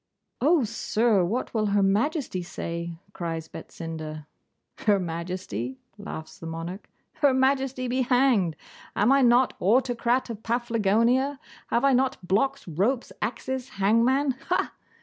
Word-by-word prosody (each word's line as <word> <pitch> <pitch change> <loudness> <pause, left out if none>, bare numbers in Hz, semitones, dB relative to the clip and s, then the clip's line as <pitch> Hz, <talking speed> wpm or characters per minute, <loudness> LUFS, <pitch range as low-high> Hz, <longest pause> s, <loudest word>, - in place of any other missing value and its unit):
'Oh, 305 +2 +4
sir! 220 -2 +1
what 225 +9 -2
will 215 -2 +1
Her 200 0 +2
Majesty 215 - 0
say?' 170 -1 -5 0.2
cries 165 -2 -4
Betsinda. 155 -3 -7 0.5
'Her 205 -2 +3
Majesty!' 170 - -4 0.2
laughs 200 -6 -8
the 165 - -7
monarch. 165 +5 -6 0.3
'Her 280 -3 +4
Majesty 265 -1 +1
be 255 +2 0
hanged. 245 - +3 0.4
Am 215 +5 +3
I 275 0 +5
not 245 +1 +4
Autocrat 245 +3 +2
of 220 -2 -7
Paflagonia? 235 +3 +1 0.3
Have 240 +3 +1
I 275 - +5
not 260 +1 +2
blocks, 270 +8 +1
ropes, 205 - 0
axes, 260 +4 -3
hangmen 235 +8 +3 0.2
ha? - - +1
230 Hz, 130 wpm, -26 LUFS, 180-260 Hz, 0.5 s, I